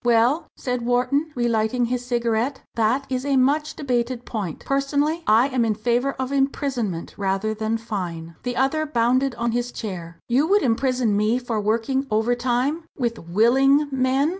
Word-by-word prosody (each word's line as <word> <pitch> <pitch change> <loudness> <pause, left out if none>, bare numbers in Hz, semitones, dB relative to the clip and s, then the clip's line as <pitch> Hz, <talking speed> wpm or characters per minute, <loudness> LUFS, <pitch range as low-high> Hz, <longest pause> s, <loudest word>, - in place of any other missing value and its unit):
"Well," 240 +6 +3
said 250 -1 -2
Wharton, 250 +6 +1
relighting 240 0 +1
his 245 +1 -2
cigarette, 240 +1 -1
"that 235 +5 +1
is 255 -1 -2
a 280 -1 +1
much 290 +4 +2
debated 245 -3 -2
point. 200 -9 -5
Personally, 285 +4 0
I 230 +5 +5
am 255 -3 +1
in 220 -2 +1
favour 240 +5 0
of 260 0 -4
imprisonment 270 - -1
rather 195 +2 0
than 220 +1 -1
fine." 175 -7 -5
The 245 -1 -3
other 310 +5 +1
bounded 255 0 +1
on 235 0 -1
his 240 +1 -2
chair. 175 -8 -6
"You 265 +6 +2
would 405 +3 +3
imprison 250 -2 +1
me 215 +3 +2
for 240 -4 -2
working 230 +6 0
overtime 245 +7 0
with 240 -4 0 0.2
_willing 270 - +4
men! 265 +2 +2
245 Hz, 160 wpm, -23 LUFS, 225-270 Hz, 0.2 s, I